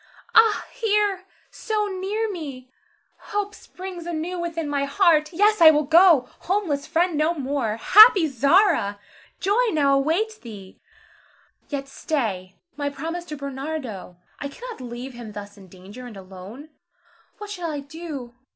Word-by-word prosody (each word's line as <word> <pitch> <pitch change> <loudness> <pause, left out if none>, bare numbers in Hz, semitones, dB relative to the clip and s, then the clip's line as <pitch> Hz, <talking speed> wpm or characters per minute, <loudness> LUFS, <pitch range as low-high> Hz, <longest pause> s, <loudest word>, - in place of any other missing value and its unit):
Ah, 445 -1 +5
here! 415 -5 0 0.3
so 430 -2 -2
near 405 +3 -2
me! 280 -10 -7 0.6
Hope 410 0 -2
springs 365 -4 -9
anew 345 +2 -4
within 335 -2 -3
my 285 -1 -1
heart. 305 0 +3
Yes, 415 +3 +2
I 320 - +11
will 305 -1 +3
go. 325 -2 +5
Homeless, 345 -7 -1
friendless 335 -2 +1
no 320 +3 +1
more! 270 -6 -2
Happy 405 - +8
Zara! 280 - +2 0.4
joy 415 +6 +2
now 285 -3 +3
awaits 340 +11 0
thee. 200 -5 -12 0.9
Yet 275 -2 -4
stay! 215 - -3 0.2
my 285 0 -2
promise 325 +5 -5
to 305 -3 -7
Bernardo! 270 - -6 0.2
I 280 - -4
cannot 470 - -9
leave 245 +2 -7
him 235 -3 -9
thus 205 0 -9
in 195 -2 -15
danger, 195 +7 -12
and 220 -4 -11
alone. 195 +10 -11 0.7
What 420 -1 -8
shall 355 -5 -4
I 295 -2 -4
do? 280 -4 -8
305 Hz, 140 wpm, -23 LUFS, 255-370 Hz, 0.9 s, I